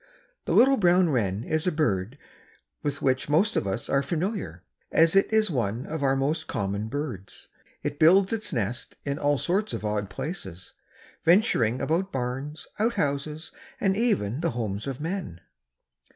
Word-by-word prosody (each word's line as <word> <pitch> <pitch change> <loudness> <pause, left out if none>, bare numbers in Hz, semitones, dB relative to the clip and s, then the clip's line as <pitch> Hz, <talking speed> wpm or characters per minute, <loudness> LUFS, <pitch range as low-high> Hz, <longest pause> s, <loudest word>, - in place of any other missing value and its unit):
The - - 0
little 270 +2 +6
brown 180 -3 +4
wren 105 -5 0
is 155 +5 -1
a - - +3
bird 120 - 0 0.6
with 145 -1 -3
which 130 +1 +1
most 190 +9 +3
of - - 0
us 95 +4 -3
are 140 - +2
familiar, 160 - -3 0.3
as 165 +2 +4
it 195 - +4
is 220 -3 +3
one 120 -2 -1
of 160 -1 -4
our 135 -1 +2
most 150 +4 -1
common 100 -2 -2
birds. 120 -7 -6 0.3
It 145 0 -3
builds 185 +6 +5
its 215 -2 -3
nest 115 - -3
in 140 +1 -2
all 145 0 +2
sorts 200 +8 0
of - - -4
odd 105 -2 -1
places, 95 - -7 0.5
venturing 165 - +3
about 185 +5 0
barns, 135 +4 -4
outhouses, 150 -8 -1 0.3
or 195 - +2
even 190 - +1
the 170 - +1
homes 105 0 -3
of 135 -2 -4
men. 165 - -4
145 Hz, 160 wpm, -26 LUFS, 115-175 Hz, 0.6 s, little